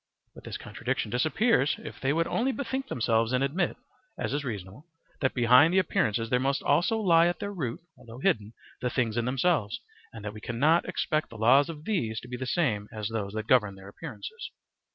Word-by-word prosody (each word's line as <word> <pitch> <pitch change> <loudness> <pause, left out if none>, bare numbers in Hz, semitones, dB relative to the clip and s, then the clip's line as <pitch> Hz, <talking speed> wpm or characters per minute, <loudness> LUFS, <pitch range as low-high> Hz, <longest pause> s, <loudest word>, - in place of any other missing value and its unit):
But - - -14
this - - -5
contradiction 105 - -3
disappears, 155 - +2
if - - -9
they 135 - +1
would 165 +3 +1
only 250 +9 0
bethink 265 0 -3
themselves 115 - +1
and 130 +1 +2
admit, 170 +7 0 0.4
as - - -2
is 145 0 -1
reasonable, 110 - -7 0.3
that 130 - 0
behind 125 +6 +6
the 185 - +2
appearances 115 - +1
there 125 - +3
must 135 +1 0
also 175 +10 +2
lie 170 -5 +5
at 175 - -1
their 205 0 -5
root 130 -11 -4
(although 115 0 -12
hidden) 115 - 0 0.3
the 125 - 0
things 115 -3 0
in 120 -1 0
themselves, 125 - +1 0.3
and 110 -2 -10
that 105 - -4
we 105 - -10
cannot 145 +10 +2
expect 155 -1 -1
the 115 - -11
laws 130 +7 +5
of 155 -1 -8
these 115 - -1
to - - -11
be 125 - -5
the 130 +1 -5
same 115 - 0
as 105 -2 -4
those 105 -3 -3
that 110 0 -3
govern 105 -5 +3
their 95 0 -12
appearances. 445 - -8
130 Hz, 205 wpm, -28 LUFS, 115-165 Hz, 0.4 s, behind